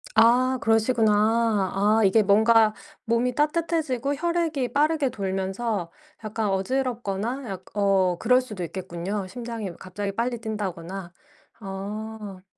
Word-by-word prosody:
아 250 +3 +4
그러시구나. 225 -2 +2
아 210 +3 +3
이게 195 +3 +5
뭔가 215 +2 +4 0.3
몸이 235 +2 +1
따뜻해지고 300 -2 0
혈액이 320 -4 -1
빠르게 300 -1 +2
돌면서 195 -2 -2 0.3
약간 215 0 -2
어지럽거나 240 +2 -2
약 185 -1 -6
어 195 -3 +2
그럴 250 0 +4
수도 215 -8 -6
있겠군요. 185 +3 -4
심장이 230 -2 -5
갑자기 200 +2 -4
빨리 240 +2 -1
뛴다거나. 195 -5 -5 0.5
어. 205 0 -6
220 Hz, 270 characters per minute, -25 LUFS, 195-250 Hz, 0.5 s, 이게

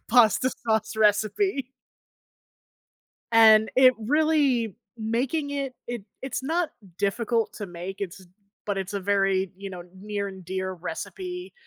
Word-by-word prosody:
pasta 245 +2 +5
sauce 220 -1 0
recipe. 220 - +2 1.7
And 220 -1 +7
it 255 -1 +7
really 270 - +2 0.2
making 245 +7 -1
it 275 -2 -3
it 240 -3 -4 0.2
it's 265 0 -3
not 325 +4 0 0.3
difficult 225 +3 0
to 205 - -5
make, 180 +2 -7
it's 190 -1 -6 0.4
but 205 -2 -1
it's 190 +1 -4
a 200 - -1
very, 195 -1 +1
you 195 0 -7
know, 180 -2 -7
near 200 +1 -4
and 190 -1 -10
dear 185 +1 -3
recipe. 360 - -6
220 Hz, 130 wpm, -26 LUFS, 195-260 Hz, 1.7 s, And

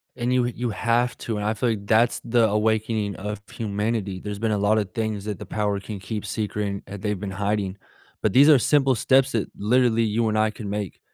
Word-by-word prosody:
And 120 +1 -1
you 125 -1 +3
you 120 0 -2
have 120 +3 +1
to, 110 -2 -3
and 105 - -3
I 110 - +1
feel 120 +2 0
like 100 -3 -3
that's 115 +3 +3
the 115 -1 +3
awakening 110 -1 0
of 105 +2 -5
humanity. 105 -2 -2
There's 105 0 -6
been 110 -1 0
a 105 - +1
lotta 105 +1 +2
things 110 -1 -3
that 105 -3 -3
the - - -8
power 105 -2 -1
can 100 0 -7
keep 105 +3 -5
secret, 105 0 -2
and 100 0 -4
that 100 -1 -8
they've 105 -3 -1
been 100 -1 -4
hiding. 100 0 -2 0.5
But 110 - +2
these 140 +4 +7
are 145 - +8
simple 135 0 +3
steps 130 +3 +3
that 110 - 0
literally 115 +1 +2
you 110 +1 +1
and 110 0 0
I 110 0 +3
can 105 -1 -7
make 105 -3 -4
110 Hz, 225 wpm, -24 LUFS, 100-115 Hz, 0.5 s, are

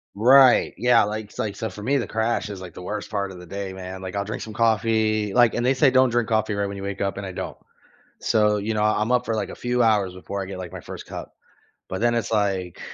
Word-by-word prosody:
Right. 130 +4 +6
Yeah, 125 -2 +4
like, 110 +1 -3
it's 105 - -16
like 105 -4 -2
so 110 0 -3
for 105 - -9
me, 135 +6 +1
the 125 - -2
crash 110 -1 -1
is, 100 -2 -7
like, 90 -3 -10
the 90 - -8
worst 105 +3 -5
part 100 -2 -2
of 90 - -10
the 90 - -12
day, 100 +1 -5
man, 95 0 -7
like, 95 0 -6
I'll 100 - 0
drink 105 - -5
some 110 - -8
coffee, 110 -2 +1
like 120 -2 +4
and 120 - 0
they 130 - +4
say, 135 +1 +4
"Don't 130 -1 +4
drink 120 0 0
coffee 110 -1 +1
right 100 0 -1
when 100 0 -6
you 95 - -7
wake 100 0 -4
up." 100 0 -1
And 100 - -5
I 95 - -5
don't, - - -6 0.6
so, 105 -1 +2
you 110 +2 -2
know, 105 - 0
I'm 105 +2 +1
up 125 0 +2
for, 115 - -1
like, 105 -2 -2
a - - -7
few 125 0 0
hours 105 -5 +2
before 100 +2 -5
I - - -6
get, 95 -1 -7
like, 90 -2 -7
my - - -7
1st - - -9
cup. - - -8 0.6
But 95 +3 -4
then 120 0 +3
it's, 115 -1 -2
like, 95 -5 -1
105 Hz, 280 wpm, -24 LUFS, 100-115 Hz, 0.6 s, Right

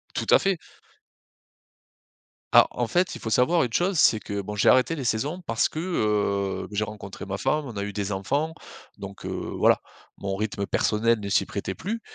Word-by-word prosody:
Tout - - -1
à - - +8
fait. 195 -3 +1 2.0
Ah, - - +8
en 120 - -1
fait 180 +9 0
il - - -9
faut 110 - -4
savoir 160 +9 +3
une 120 - -2
chose, 180 - +1
c'est 110 -8 +5
que 100 -1 -4
bon 105 +2 -6
j'ai - - +2
arrêté 130 +6 +4
les 135 - -4
saisons, 145 +12 -1
parce 115 -1 +1
que, 155 - -5
heu, 105 - 0
j'ai 105 +1 0
rencontré 100 -2 -8
ma 95 0 -4
femme, 150 +6 0
on 120 -6 -8
a 100 - -2
eu 100 0 -5
des 105 -1 -3
enfants. 140 +12 -1 0.4
Donc, 100 -1 -9
heu, - - -3 0.3
voilà - - +4 0.4
mon 95 -1 -3
rythme 100 -1 -2
personnel 115 +1 +2
ne 100 - -4
s'y - - +2
prêtait - - -4
plus. 225 +6 -4
110 Hz, 200 wpm, -25 LUFS, 100-155 Hz, 2.0 s, à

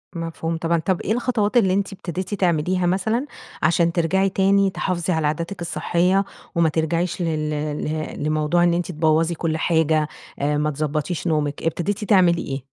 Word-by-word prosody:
مفهوم 165 0 -3
طبعًا. 170 +1 +1
طب 175 +3 -1
إيه - - -3
الخطوات 235 -2 0
اللي 190 -6 +4
أنتِ 195 0 -1
ابتديتِ 185 +1 -5
تعمليها 180 -1 +1
مثلًا 220 +8 0 0.4
عشان 170 +1 +3
ترجعي 185 +3 +1
تاني 195 +1 +3
تحافظي 185 -1 -1
على 160 -2 +1
عاداتك 170 +5 -3
الصحية، 180 +3 +1 0.3
وما 170 -1 +3
ترجعيش 165 +3 -1
لل 155 -2 -2 0.3
لِ - - -4
لموضوع 155 +3 +1
إن 175 -1 +3
أنتِ 175 +1 -1
تبوظي 160 +1 +2
كل 160 -1 -1
حاجة، 160 -2 +2 0.3
آآ 145 +1 +1
ما 150 +1 0
تضبطيش 150 +4 -2
نومك، 150 -3 -1
ابتديتِ 175 +6 -1
تعملي 185 -5 +4
إيه؟ 135 -1 -5
170 Hz, 160 wpm, -22 LUFS, 155-185 Hz, 0.4 s, اللي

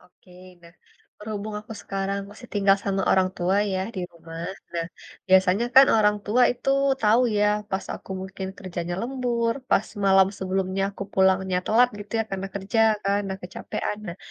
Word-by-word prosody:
Oke, 180 +1 -25 0.3
nah, 170 0 -16 0.5
berhubung 210 0 -5
aku 215 +1 -10
sekarang 195 0 -2
masih 230 +4 -13
tinggal 195 -1 +4
sama 195 -1 0
orang 185 -1 +4
tua, 180 +3 +1 0.2
ya, 185 - -1 0.2
di - - -2
rumah. 165 0 -9 0.3
Nah, 170 -1 -2 0.4
biasanya 190 +3 +4
kan 270 +1 +9
orang 210 -1 +3
tua 235 +5 +3
itu 245 +2 -2 0.3
tahu 220 +3 +4 0.2
ya, 205 0 +3 0.2
pas 190 0 -2
aku - - -13
mungkin 190 0 -6
kerjanya 175 -2 -4
lembur, 235 -2 -1 0.2
pas 200 - +4 0.2
malam 190 -1 +6
sebelumnya 190 0 -1
aku 200 - -7
pulangnya 190 -1 +2
telat, 240 +3 +4
gitu 205 - -10
ya, - - 0
karena 195 0 -3
kerja 200 +3 -1 0.2
kan, 200 +1 +2
nah, 190 - -3
kecapekan. 180 +3 -4
Nah, 175 - -6
195 Hz, 170 wpm, -25 LUFS, 185-210 Hz, 0.5 s, kan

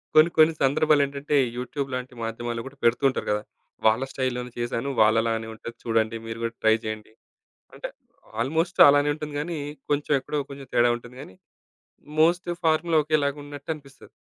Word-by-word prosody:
కొన్ని, 155 +2 +7
కొన్ని 160 +1 +6
సందర్భాలేంటంటే 140 0 +2 0.2
యూట్యూబ్ 135 +2 -4
లాంటి 125 0 -4
మాధ్యమాల్లో 115 +1 -4
కూడా 135 +1 -10
పెడుతూంటారు 120 +3 +2
కదా! 105 0 0 0.4
వాళ్ళ 110 +4 +4
స్టైల్‌లోనే 125 -1 -2
చేశాను, 120 +2 -2
వాళ్ళలానే 115 +1 +2
ఉంటది 115 +1 -9
చూడండి, 115 0 +1
మీరు 115 0 -6
కూడా 115 0 -2
ట్రై 110 0 +5
చేయండి. 110 0 -6 0.6
అంటే - - -5 0.5
ఆల్మోస్ట్ 160 +8 -1
అలానే 145 +1 +4
ఉంటుంది 150 -1 -7
గానీ, 165 +2 -3 0.3
కొంచెం 145 +1 0
ఎక్కడో 145 +2 -3
కొంచెం 140 -1 -9
తేడా 120 0 +4
ఉంటుంది 120 +1 -14
గానీ, 95 - -12 0.9
మోస్ట్ 175 +2 +3
ఫార్ములా 160 +1 +3
ఒకేలాగున్నట్టనిపిస్తది. 145 -1 -3
135 Hz, 140 wpm, -25 LUFS, 115-150 Hz, 0.9 s, కొన్ని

